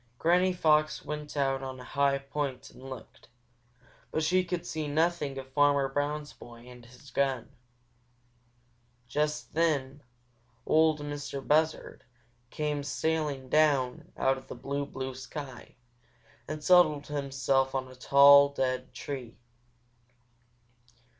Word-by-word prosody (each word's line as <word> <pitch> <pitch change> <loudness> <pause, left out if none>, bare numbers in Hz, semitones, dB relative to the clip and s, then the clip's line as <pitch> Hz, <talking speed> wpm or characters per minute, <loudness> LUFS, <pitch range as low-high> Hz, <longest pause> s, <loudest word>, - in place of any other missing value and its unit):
Granny 180 +5 +3
Fox 155 -3 +2
went 150 0 -6
out 135 -1 +1
on 130 -1 -6
a - - -9
high 140 +1 +1
point 140 -2 -5
and - - -16
looked, 130 -4 -11 0.8
but 155 - -1
she 185 +4 +3
could 175 -1 -4
see 155 -3 -4
nothing 150 -2 0
of 130 0 -9
Farmer 145 -1 +3
Brown's 145 +2 -3
boy 120 0 -14
and 125 -1 -13
his 125 +3 -16
gun. 135 -2 -1 1.6
Just 150 +3 -2
then 145 -4 0 0.6
Ol' 160 0 +4
Mistah 145 -1 -5
Buzzard 155 +2 0 0.5
came 150 0 -2
sailing 145 -1 -2
down 140 -4 +1
out 135 0 +1
of - - -19
the - - -8
blue, 140 0 -4
blue 130 -1 -5
sky 130 -1 -9 0.7
and 155 0 -6
settled 155 -5 +5
himself 135 -2 0
on 130 -1 -2
a 130 - -13
tall, 140 +2 +7
dead 130 -2 -3
tree. 130 -5 -7
140 Hz, 125 wpm, -29 LUFS, 135-150 Hz, 1.6 s, tall